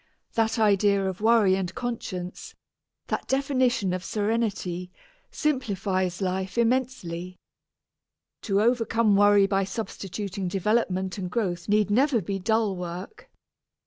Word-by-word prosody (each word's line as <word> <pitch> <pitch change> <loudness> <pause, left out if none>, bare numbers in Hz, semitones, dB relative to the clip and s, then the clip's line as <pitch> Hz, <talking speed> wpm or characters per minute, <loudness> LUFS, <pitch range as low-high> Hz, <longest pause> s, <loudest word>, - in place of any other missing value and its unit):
That 225 +1 +1
idea 200 -2 +3
of 190 +1 -4
worry 220 -4 +4
and 185 -2 -3
conscience, 190 -7 -5 0.5
that - - -3
definition 260 -7 +1
of 185 0 -3
serenity, 205 -5 -2 0.4
simplifies 195 - -1
life 190 +3 -2
immensely. 230 -8 -1 1.1
To 200 -2 +1
overcome 225 -2 +2
worry 205 0 +6
by 195 0 +1
substituting 195 -1 -5
development 190 -1 0
and 180 -2 -3
growth 180 -4 -2
need 210 0 +3
never 260 +2 +3
be 195 +1 -3
dull 220 0 +1
work. 180 - -7
200 Hz, 110 wpm, -26 LUFS, 185-230 Hz, 1.1 s, worry